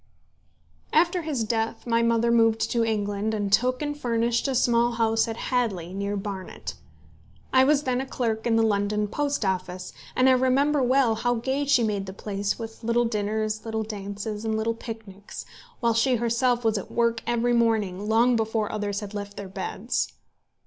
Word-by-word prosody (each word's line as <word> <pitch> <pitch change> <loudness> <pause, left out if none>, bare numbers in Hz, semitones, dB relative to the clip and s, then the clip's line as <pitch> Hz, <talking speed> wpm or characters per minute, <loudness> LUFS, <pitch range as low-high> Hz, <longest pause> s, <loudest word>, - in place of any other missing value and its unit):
After 345 +3 +3
his 295 -7 -2
death 225 0 -2
my 230 -1 +2
mother 230 0 +2
moved 225 -1 +3
to 235 -1 +2
England, 210 -1 -1
and 205 -2 -2
took 255 +5 +2
and 290 0 -2
furnished 235 -2 0
a 270 - -1
small 240 -1 +3
house 225 -1 +2
at 225 0 -4
Hadley, 200 -9 -1
near 200 +1 -2
Barnet. 195 -2 -6 0.8
I 260 0 +6
was 295 +1 +3
then 255 -1 0
a 265 - -5
clerk 225 -3 -2
in 230 - +3
the 225 - +4
London 210 0 +1
Post 285 +1 -1
Office, 185 -1 -3 0.2
and 255 - +4
I - - +7
remember 265 +3 +3
well 255 -2 +3
how 245 +2 0
gay 265 +5 -1
she 270 -4 +4
made 205 -3 -1
the 190 - -6
place 200 0 -3
with 225 0 -8
little 235 +1 +2
dinners, 215 0 -1
little 220 -1 -2
dances, 210 0 -5
and 220 -1 -1
little 225 +1 0
picnics, 220 -4 -9 0.4
while 235 -1 +3
she 235 +3 +3
herself 240 +1 +1
was 220 -2 +2
at - - -9
work 235 -1 +1
every 240 0 +1
morning 215 -4 +1
long 235 +3 +4
before 220 -1 0
others 205 -1 -2
had 205 0 -7
left 205 -1 -6
their 200 -2 -6
beds. 195 +4 -2
225 Hz, 180 wpm, -25 LUFS, 210-240 Hz, 0.8 s, I